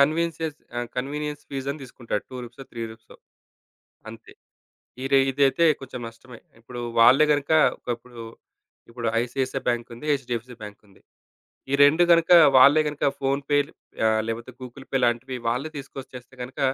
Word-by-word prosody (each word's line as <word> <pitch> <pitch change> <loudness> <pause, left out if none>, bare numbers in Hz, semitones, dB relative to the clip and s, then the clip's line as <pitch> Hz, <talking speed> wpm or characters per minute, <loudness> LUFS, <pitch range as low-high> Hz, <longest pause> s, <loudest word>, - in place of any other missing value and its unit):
Conveyance 165 +4 +2
చేసి 155 -2 -3 0.2
ఆ! - - 0 0.2
Convenience 145 +3 -4
fees 135 -1 -5
అని 145 +1 -6
దీసుకుంటాడు. 120 -4 -5
2 130 - -8
రూపీసో, 120 +3 -12
3 115 - -6
రూపీసో. 110 0 -16 0.9
అంతే. 115 0 -13 0.7
ఈడ 135 +1 -4 0.2
ఇదైతే 140 +5 +2 0.2
కొంచెం 130 -2 -8
నష్టమే. 120 +1 -14 0.2
ఇప్పుడు 120 +1 -9 0.2
వాళ్ళే 130 +6 +7
గనుక 145 0 -2 0.3
ఒకప్పుడు 120 0 -7 0.7
ఇప్పుడు 120 -1 -5 0.2
ఐసీఐసీఐ 130 +2 -3
బ్యాంక్ 120 -1 -1
ఉంది, 135 +6 -10
హెచ్‌డీ‌ఎఫ్‌సీ 125 -2 -3
బ్యాంక్ 105 0 -9
ఉంది, 95 - -23 0.7
ఈ - - 0
2 155 +5 +6
గనక 165 -1 +4 0.3
వాళ్ళే 140 +4 +7
గనక 150 0 -5 0.2
ఫోన్‌పే 140 +1 +1 0.5
ఆ! - - +5 0.2
లేపోతే 115 +2 -5
గూగుల్ 130 +2 -10
పే 135 - +2
లాంటివి 120 +2 -1
వాళ్ళే 125 +6 -1
తీసుకొచ్చేస్తే 135 -2 -10
గనక 130 +3 -10
130 Hz, 145 wpm, -24 LUFS, 120-145 Hz, 0.9 s, వాళ్ళే